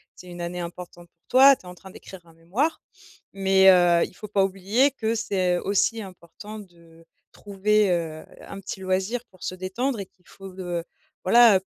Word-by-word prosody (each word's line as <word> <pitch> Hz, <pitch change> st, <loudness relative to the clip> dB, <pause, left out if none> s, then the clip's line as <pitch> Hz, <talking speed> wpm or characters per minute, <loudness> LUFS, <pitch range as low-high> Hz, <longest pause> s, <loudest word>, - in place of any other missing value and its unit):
c'est 180 Hz, -, -14 dB
une 175 Hz, -1 st, -9 dB
année 175 Hz, +1 st, -5 dB
importante 175 Hz, 0 st, -9 dB
pour 165 Hz, -, -55 dB
toi. 270 Hz, +2 st, +7 dB
Tu -, -, -23 dB
es -, -, -18 dB
en 180 Hz, -, -9 dB
train 190 Hz, +2 st, -14 dB
d'écrire 185 Hz, -1 st, -12 dB
un 165 Hz, -, -19 dB
mémoire. 195 Hz, -, -2 dB, 0.5 s
Mais 190 Hz, 0 st, +4 dB
heu, 175 Hz, -2 st, +4 dB
il -, -, -17 dB
faut 210 Hz, -, -8 dB
pas 205 Hz, -1 st, +1 dB
oublier 195 Hz, +8 st, +1 dB
que 225 Hz, -4 st, -2 dB
c'est 185 Hz, -5 st, 0 dB
aussi 205 Hz, +5 st, 0 dB
important 195 Hz, +2 st, -11 dB
de 170 Hz, -4 st, -18 dB, 0.3 s
trouver, 205 Hz, 0 st, 0 dB
heu, 165 Hz, -3 st, -3 dB, 0.2 s
un 195 Hz, -, -10 dB
petit 195 Hz, 0 st, -7 dB
loisir 190 Hz, +6 st, -2 dB
pour 185 Hz, -, -23 dB
se -, -, -4 dB
détendre 215 Hz, +7 st, -3 dB
et 195 Hz, -, -6 dB
qu'il 180 Hz, -1 st, -37 dB
faut, 195 Hz, -, -13 dB
heu, 175 Hz, -2 st, -3 dB, 0.4 s
voilà, 225 Hz, 0 st, +6 dB
190 Hz, 190 wpm, -24 LUFS, 175-210 Hz, 0.5 s, toi